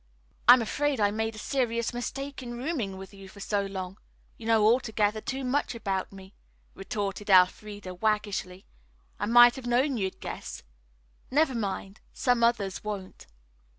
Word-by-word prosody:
"I'm 245 Hz, 0 st, +9 dB
afraid 290 Hz, +3 st, -1 dB
I 205 Hz, -1 st, +3 dB
made 220 Hz, +1 st, -2 dB
a -, -, -11 dB
serious 235 Hz, 0 st, -1 dB
mistake 275 Hz, +3 st, -5 dB
in 240 Hz, -1 st, -6 dB
rooming 245 Hz, -, -3 dB
with 190 Hz, +1 st, -10 dB
you 195 Hz, -1 st, -12 dB
so 200 Hz, +1 st, -2 dB
long. 190 Hz, 0 st, -6 dB, 0.4 s
You 225 Hz, -, -9 dB
know 225 Hz, -2 st, +4 dB
altogether 220 Hz, -2 st, +2 dB
too 265 Hz, +4 st, -4 dB
much 255 Hz, 0 st, 0 dB
about 195 Hz, -4 st, -2 dB
me," 190 Hz, 0 st, -13 dB, 0.4 s
retorted 200 Hz, +1 st, -4 dB
Elfreda 190 Hz, +1 st, +3 dB
waggishly. 200 Hz, -2 st, -2 dB, 0.5 s
"I 205 Hz, -, -1 dB
might 240 Hz, +1 st, +7 dB
have 250 Hz, -2 st, -7 dB
known 255 Hz, +2 st, +2 dB
you'd 190 Hz, -3 st, -3 dB
guess. -, -, -7 dB, 0.7 s
Never 290 Hz, 0 st, +2 dB
mind. 200 Hz, -3 st, -4 dB
Some 245 Hz, -2 st, +1 dB
others 220 Hz, -5 st, +1 dB
won't." 200 Hz, -3 st, -6 dB
215 Hz, 150 wpm, -28 LUFS, 195-245 Hz, 0.7 s, I'm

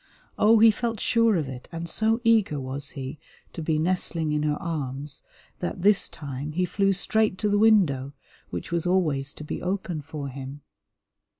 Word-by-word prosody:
Oh, 220 Hz, +2 st, +6 dB
he 225 Hz, +1 st, +7 dB
felt 230 Hz, 0 st, -3 dB
sure 230 Hz, -2 st, +3 dB
of 155 Hz, -5 st, -1 dB
it, 130 Hz, -1 st, -8 dB
and 165 Hz, 0 st, -5 dB
so 220 Hz, +6 st, +1 dB
eager 220 Hz, -, +3 dB
was 135 Hz, +2 st, -5 dB
he 135 Hz, +2 st, -6 dB, 0.3 s
to 165 Hz, -, -6 dB
be 155 Hz, 0 st, 0 dB
nestling 165 Hz, -1 st, 0 dB
in 150 Hz, 0 st, 0 dB
her 150 Hz, -1 st, +1 dB
arms 140 Hz, -3 st, -4 dB, 0.4 s
that 175 Hz, 0 st, -4 dB
this 205 Hz, 0 st, +5 dB
time 145 Hz, +1 st, -6 dB
he 180 Hz, +3 st, +1 dB
flew 195 Hz, +2 st, +1 dB
straight 210 Hz, +1 st, +1 dB
to 210 Hz, +2 st, 0 dB
the 205 Hz, 0 st, +2 dB
window, 165 Hz, -12 st, +3 dB, 0.4 s
which -, -, -6 dB
was 170 Hz, 0 st, 0 dB
always 155 Hz, -7 st, +1 dB
to -, -, -8 dB
be 150 Hz, -, -5 dB
open 180 Hz, -3 st, -2 dB
for 145 Hz, -1 st, -6 dB
him. 135 Hz, +2 st, -8 dB
165 Hz, 180 wpm, -26 LUFS, 145-200 Hz, 0.4 s, he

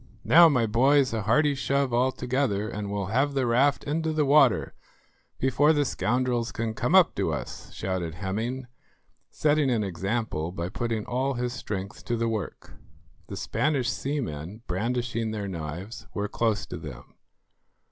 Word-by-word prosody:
"Now, 170 Hz, +1 st, +7 dB
my 125 Hz, -6 st, +2 dB
boys, 130 Hz, +4 st, +3 dB
a 110 Hz, -, -1 dB
hearty 145 Hz, +8 st, +3 dB
shove 135 Hz, -1 st, 0 dB
altogether, 125 Hz, -3 st, 0 dB
and 105 Hz, -2 st, -5 dB
we'll 100 Hz, -1 st, -3 dB
have 140 Hz, +3 st, +1 dB
the 135 Hz, -2 st, +1 dB
raft 130 Hz, +4 st, +2 dB
into 160 Hz, +2 st, -1 dB
the 155 Hz, -1 st, +1 dB
water 140 Hz, -3 st, +4 dB, 0.6 s
before 135 Hz, +4 st, +3 dB
the 145 Hz, -1 st, +2 dB
scoundrels 120 Hz, +2 st, 0 dB
can 115 Hz, -1 st, -3 dB
come -, -, 0 dB
up -, -, +6 dB
to -, -, 0 dB
us," -, -, -6 dB
shouted 90 Hz, -3 st, -3 dB
Hemming, 110 Hz, +8 st, -3 dB, 0.6 s
setting 150 Hz, -2 st, +2 dB
an 115 Hz, -4 st, +1 dB
example 95 Hz, -3 st, -2 dB
by 90 Hz, -1 st, -4 dB
putting 115 Hz, +1 st, -2 dB
all 130 Hz, +2 st, -1 dB
his 120 Hz, 0 st, -2 dB
strength 105 Hz, -5 st, -6 dB
to 120 Hz, -, -1 dB
the 115 Hz, 0 st, 0 dB
work. 110 Hz, -4 st, -5 dB, 0.5 s
The -, -, -6 dB
Spanish 145 Hz, -5 st, 0 dB
seamen, 110 Hz, -, -4 dB
brandishing 115 Hz, +3 st, -2 dB
their 105 Hz, -2 st, -4 dB
knives, 90 Hz, +7 st, -6 dB
were 105 Hz, 0 st, -1 dB
close 110 Hz, -1 st, 0 dB
to -, -, -7 dB
them. -, -, -10 dB
120 Hz, 155 wpm, -26 LUFS, 105-135 Hz, 0.6 s, Now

